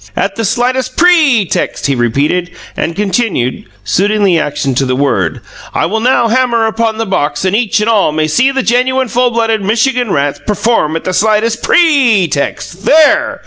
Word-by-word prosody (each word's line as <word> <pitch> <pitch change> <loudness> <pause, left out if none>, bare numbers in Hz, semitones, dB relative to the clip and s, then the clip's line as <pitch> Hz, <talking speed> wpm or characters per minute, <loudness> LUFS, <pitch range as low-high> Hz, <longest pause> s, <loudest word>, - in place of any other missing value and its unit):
"At 195 0 -2
the 225 - -2
slightest 250 +4 -1
PRE 315 - +4
text!" - - -3
he 140 - +1
repeated, 140 +9 -1 0.3
and 165 - -3
continued, 195 - -2 0.2
suiting 205 - 0
the 180 -4 +3
action 145 -2 -2
to 135 +2 0
the 130 - 0
word: 125 - -1 0.3
"I - - +1
will 215 +6 -2
now 240 0 +2
hammer 235 -1 +1
upon 220 0 -1
the 225 - -2
box 145 -5 -2
and 190 +2 +1
each 220 -1 0
and 210 - -1
all 215 -8 +2
may 155 0 -1
see 245 - +1
these 270 -1 -2
genuine 255 +2 +1
full 245 +1 +1
blooded 225 -2 -1
Michigan 240 +3 0
rats 140 -2 -1
perform 210 -6 0
at 165 - -4
the 185 - -3
slightest 220 +3 +1
PRE 270 - +3
text! 170 +5 -4
There! 290 -1 +3
215 Hz, 185 wpm, -12 LUFS, 165-245 Hz, 0.3 s, PRE